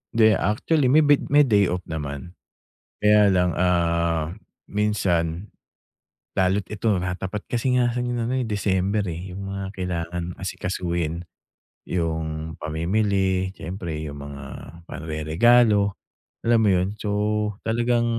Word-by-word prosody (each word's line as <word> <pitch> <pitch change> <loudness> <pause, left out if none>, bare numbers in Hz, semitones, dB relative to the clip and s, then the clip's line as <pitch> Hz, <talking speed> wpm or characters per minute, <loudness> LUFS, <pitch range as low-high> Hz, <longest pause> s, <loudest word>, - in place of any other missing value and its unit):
'Di, 110 -1 +6
actually, 130 +7 +1
may 150 +4 +5
bit 145 -1 +3
may 145 +1 +6
day 105 -7 +3
off 90 +1 -2
naman. 75 0 -5 0.7
Kaya 105 -1 +5
lang, 90 -1 +3
ah, 85 -2 +1 0.4
minsan 95 -4 0 0.9
lalo't 95 +2 +2
ito 105 +2 -1
nakatapat 90 +3 -3
kasi 125 +1 0
nga 120 -1 +2
sa 125 - -2
ano 120 0 -2
ngayon, 130 +1 0
eh, 115 - -4
December, 100 0 0
eh. 90 +3 -7
Yung 100 +2 -6
mga 100 0 -4
kailangan 90 -2 -3 0.2
asikasuhin, 85 -3 -3 0.6
yung 80 -2 -2
pamimili, 95 +3 0
siyempre, 85 -3 -5
yung 70 -2 -6
mga 70 -1 -8 0.5
panreregalo, 100 +7 +3 0.5
alam 115 0 +4
mo 105 - +3
yun? 90 +3 0
So, 105 - -2 0.5
talagang 120 +1 +1
95 Hz, 125 wpm, -24 LUFS, 85-110 Hz, 0.9 s, Di